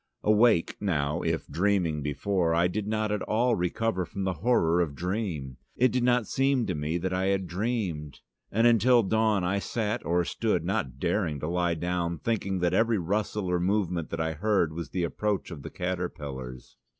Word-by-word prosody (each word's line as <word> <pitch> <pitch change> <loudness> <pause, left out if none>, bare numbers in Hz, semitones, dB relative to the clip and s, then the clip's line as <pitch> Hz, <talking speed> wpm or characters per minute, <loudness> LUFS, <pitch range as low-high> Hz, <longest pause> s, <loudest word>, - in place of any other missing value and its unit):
Awake, 105 -4 +3
now, 75 -7 0
if - - -1
dreaming 90 -5 +1
before, 80 +4 0
I 85 +1 +3
did 100 +3 -3
not 110 0 0
at 105 - -1
all 120 +2 +1
recover 90 +2 -1
from 95 +4 -5
the 95 -1 0
horror 90 -8 +3
of 75 -5 -2
dream: 85 - -3 0.2
it 130 +1 +3
did 125 - 0
not 125 -2 +3
seem 135 +1 +1
to - - -1
me 75 +3 -2
that 95 +1 -2
I 95 +1 0
had 95 -1 +1
dreamed. 90 - -3 0.3
And 115 +3 +2
until 120 +1 +5
dawn, 110 -1 +2
I 95 +3 +1
sat 105 +1 -2
or 85 0 +1
stood, 100 -6 -1
not 95 - -2
daring 85 -1 -1
to 75 - -2
lie 85 0 0
down, 85 0 -2
thinking 100 -2 -1
that 90 -1 +2
every 115 0 +3
rustle 100 +3 -1
or 90 -1 0
movement 90 -3 0
that 85 - -4
I 80 0 0
heard 95 -2 +1
was 85 +1 -5
the 90 - -2
approach 100 +3 -2
of 80 -4 -7
the - - -7
caterpillars. 75 -9 -5
90 Hz, 185 wpm, -28 LUFS, 85-105 Hz, 0.3 s, until